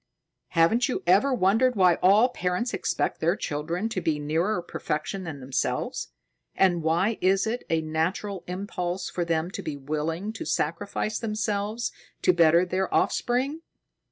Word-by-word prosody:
Haven't 225 +11 +4
you - - -2
ever 195 +10 +4
wondered 240 +3 +3
why 180 -3 +4
all 205 +7 +5
parents 185 +2 -2
expect - - -1
their 170 +3 +2
children 165 +5 -2
to 190 -5 -3
be 160 -3 0
nearer 165 +8 0
perfection 175 +3 -4
than 155 -4 -6
themselves, 130 -1 -2 0.5
and 175 -3 +3
why 170 +8 +1
is 190 +1 +3
it 235 +3 -2
a 165 -1 +2
natural 170 +5 -2
impulse 180 -1 -3
for 175 - -1
them 170 +1 -1
to - - -5
be 150 -2 -5
willing 155 +8 -3
to - - -6
sacrifice 205 +6 -2
themselves 215 0 -2 0.3
to 180 - +5
better 170 +1 +5
their 185 +1 -1
offspring?" 265 +6 0
185 Hz, 150 wpm, -26 LUFS, 165-215 Hz, 0.5 s, all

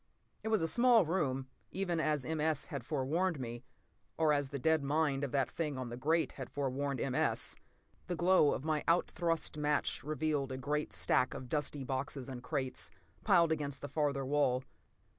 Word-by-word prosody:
p> - - -43
It - - -1
was 220 -5 +2
a - - +2
small 235 +1 +5
room, 145 -6 0 0.3
even 180 -3 -1
as 150 -3 0
M. 160 -1 -2
S. 155 -2 +1
had 140 -7 -5
forewarned 155 +5 0
me—or 120 - -3
as 145 -2 0
the 140 - -4
dead 160 +2 +2
mind 145 -1 +1
of 140 - -2
that 135 -2 +1
thing 150 -5 -2
on 130 -2 -4
the 120 - -5
grate 160 +6 +1
had 130 -3 -7
forewarned 140 -1 -2
M. 130 - -1
S. - - +1 0.5
The 180 - -1
glow 175 -3 +5
of 135 - -3
my 155 -2 0
out 170 +1 +3
thrust 165 -3 -1
match 150 -3 0
revealed 150 -2 -1
a 130 - -3
great 150 +3 -2
stack 125 - +1
of 130 -2 -7
dusty 145 -1 -1
boxes 135 0 -4
and 125 -2 -6
crates, 130 +1 -3 0.3
piled 170 -1 +5
against 145 -3 -2
the - - -3
farther 140 -2 0
wall. 130 -2 +2
145 Hz, 190 wpm, -34 LUFS, 130-160 Hz, 0.5 s, small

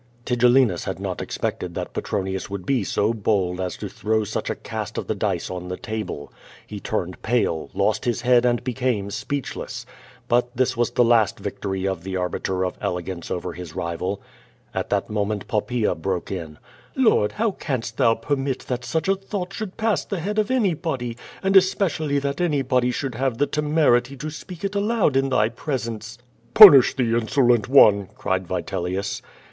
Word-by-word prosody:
Tigellinus 125 -5 +3
had 95 -1 -4
not 95 -2 -4
expected - - -4
that - - -5
Petronius 95 -1 -3
would 100 -2 -6
be 130 -3 +1
so 105 +3 0
bold 95 -4 0
as 90 -1 -3
to - - -5
throw 110 0 -1
such 105 +1 -3
a - - -1
cast - - -6
of - - -2
the - - -1
dice - - -2
on 90 -1 -5
the 90 0 -4
table. 110 -10 -5 0.3
He 105 - -7
turned 95 -3 -3
pale, 110 -9 0
lost - - +1
his 120 -1 0
head 125 -1 +4
and 120 -1 +1
became 125 -5 -1
speechless. 140 +4 -4 0.4
But 120 0 +1
this 130 0 +1
was 120 0 +1
the 125 - +3
last 115 -3 +3
victory 95 -1 -3
of 95 -4 -2
the 95 +2 -5
Arbiter 90 +1 -1
of 90 - -5
Elegance 90 -1 -4
over 90 0 -3
his 90 -3 -9
rival. 85 +4 -3 0.5
At - - -3
that - - -1
moment 105 -1 -2
Poppaea 110 +1 0
broke 90 +2 -3
in: 80 -5 -6 0.4
"Lord, 225 - +3
how 225 0 0
canst 125 -10 -4
thou 115 -1 +4
permit 135 +2 -2
that 125 -1 -4
such 160 +9 -2
a 195 - +4
thought 195 -1 -5
should 215 -4 -6
jmss 220 -2 0
the 200 - -2
head 205 +6 -2
of 210 - +1
anybody, 165 - -1 0.3
and 195 0 +1
especially 180 -6 +3
that 140 +2 -2
anybody 135 -6 +1
should 130 +1 -3
have 130 0 -1
the 145 - +3
temerity 145 -4 +2
to 150 - -5
S]»eak 160 +4 -9
it 200 0 -2
aloud 205 - +1
in 135 0 +2
thy 110 -5 +3
presence?" 115 -3 -4 0.4
"Punish 175 - +10
the 120 -4 +1
insolent 120 -1 +2
one!" 105 -8 +6
cried 95 -2 -2
Vitelius. 90 +2 -3
120 Hz, 175 wpm, -23 LUFS, 95-140 Hz, 0.5 s, Punish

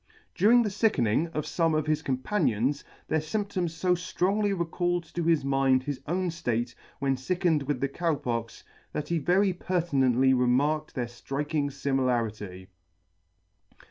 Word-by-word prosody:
During 235 +6 +5
the 210 - -2
fickening 170 - +2
of 150 - -1
fome 165 -2 +1
of 155 - -1
his 155 -1 0
companions, 135 - 0 0.2
their 160 - +1
fymp 200 +6 -3
toms 175 -5 -3
fo 180 0 +3
ftrongly 195 +3 0
recalled 175 +1 -1
to 175 - -2
his 160 -4 +2
mind 135 -1 +2
his 145 -1 -4
own 180 +2 0
ftate 120 -6 -2 0.2
when 135 -1 0
fick 175 +8 -3
ening 160 -4 +3
with 145 -4 -1
the 140 - +2
Cow 165 +3 -1
Pox, 115 -4 -4 0.3
that 150 0 -4
he 170 -1 +1
very 185 +5 +2
pertinently 135 -8 +2
remarked 140 +5 +1
their 125 - -1
flriking 140 +5 -3
fimilarity. 115 -9 -1
150 Hz, 150 wpm, -28 LUFS, 130-175 Hz, 0.3 s, During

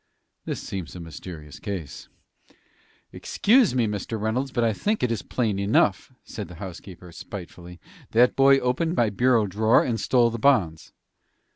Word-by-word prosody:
"This - - -4
seems 95 -3 -6
a - - -7
mysterious 80 -3 -10
case." 95 -8 -7 1.0
"Excuse 230 - +2
me, 120 -3 +2
Mr. 105 +1 -4
Reynolds, 120 +6 -2
but 120 - 0
I 115 -1 +2
think 210 - -1
it 125 - +1
is 115 - -2
plain 110 -6 -2
enough," 100 +1 +1
said 105 - -7
the 90 - -11
housekeeper, 90 0 -10
spitefully. 90 -1 -10 0.3
"That 120 +2 +3
boy 135 0 +6
opened 135 +7 -1
my 115 -9 +2
bureau 120 +1 +2
drawer, 110 +4 +3
and 115 -3 -2
stole 120 +1 +2
the 115 - -5
bonds." 100 - +1
110 Hz, 155 wpm, -24 LUFS, 90-125 Hz, 1.0 s, boy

